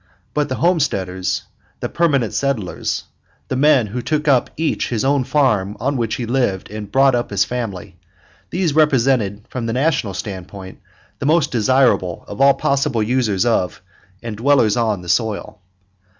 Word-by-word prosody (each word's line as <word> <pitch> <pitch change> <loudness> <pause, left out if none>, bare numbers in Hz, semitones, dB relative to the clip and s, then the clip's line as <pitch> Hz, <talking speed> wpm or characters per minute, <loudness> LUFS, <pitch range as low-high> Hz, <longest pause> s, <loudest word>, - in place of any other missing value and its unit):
But 150 -1 0
the 130 - -1
homesteaders, 100 - 0 0.4
the - - -2
permanent 140 -9 +1
settlers, 120 -10 -2 0.5
the - - -1
men 135 -3 +4
who 115 +4 -4
took 155 +3 -1
up 135 -4 +3
each 160 0 -1
his 115 0 -1
own 140 -1 +2
farm 125 -8 +1
on 140 +5 -1
which 115 -3 -1
he 120 - -4
lived 115 -7 -1
and 105 -2 -7
brought 135 0 +4
up 120 -1 -1
his - - +1
family, 100 -6 -5 0.5
these 175 -4 0
represented 130 -9 +2
from 120 -3 -4
the 115 - -1
National 130 - 0
standpoint 95 -1 -7 0.4
the 140 - -2
most 155 -1 +3
desirable 120 -7 +2
of 105 - -6
all 140 0 +6
possible 140 -5 0
users 110 -4 +1
of, 90 -8 0 0.4
and 115 -3 -5
dwellers 120 -3 +3
on, 110 -6 0
the - - -11
soil. 105 +1 -1
120 Hz, 160 wpm, -19 LUFS, 105-140 Hz, 0.5 s, all